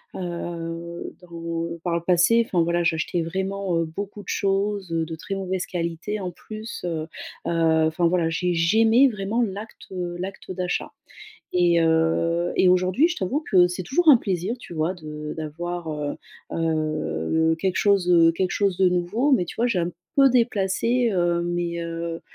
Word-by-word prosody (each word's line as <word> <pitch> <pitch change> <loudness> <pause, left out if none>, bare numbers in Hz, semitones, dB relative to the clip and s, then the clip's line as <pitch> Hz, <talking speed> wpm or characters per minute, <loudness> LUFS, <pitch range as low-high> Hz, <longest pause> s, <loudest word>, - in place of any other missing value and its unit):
heu, 170 -1 -5
dans 170 -1 -5
par 175 - -1
le 170 - -1
passé, 180 +6 +4
enfin, 175 -6 +1
voilà, 170 +1 +1
j'achetais 165 +1 0
vraiment, 190 +1 -2
heu, 165 - +1
beaucoup 200 +5 -7
de - - -24
choses, 195 -1 0
heu, 165 -1 0
de 160 0 -6
très 195 +5 -5
mauvaise 190 -1 -2
qualité, 175 +4 -3
en 185 -2 -4
plus, 215 +5 -8
heu - - -1 0.6
heu, 160 -1 +2
enfin, 170 +2 +1
voilà. 170 -1 +1
J'ai 175 +2 0
j'aimais 225 +9 +5
vraiment 210 +2 -2
l'acte, 210 +1 -6
heu, 175 -2 -4
l'acte 190 +1 -6
d'achat 180 -1 -2 0.6
et 175 -1 +3
heu, 165 +1 +2
et 185 - +5
aujourd'hui, 185 - +3
je 350 - -3
t'avoue 225 +11 -1
que 180 -2 +6
c'est 180 +1 -4
toujours 320 - +1
un 275 - +9
plaisir, 195 +1 -2
tu 200 - -10
vois, 160 +2 0
de 150 -3 -7
d'avoir, 170 +2 -5
heu 150 -1 -3 0.4
heu, 155 - 0
quelque 185 +1 -1
chose, 200 -3 +3
heu, 165 -1 +6
quelque 180 +2 -1
chose 205 - +1
de 185 -1 +5
nouveau 180 +10 0
mais 225 -9 +4
tu - - -8
vois, 235 - +2
j'ai 235 -7 0
un 170 0 0 0.3
peu 275 -1 +7
déplacé, 235 0 +1
heu, 175 -2 +1
mes, 175 0 -2
heu 165 0 -4
175 Hz, 175 wpm, -24 LUFS, 165-195 Hz, 0.6 s, un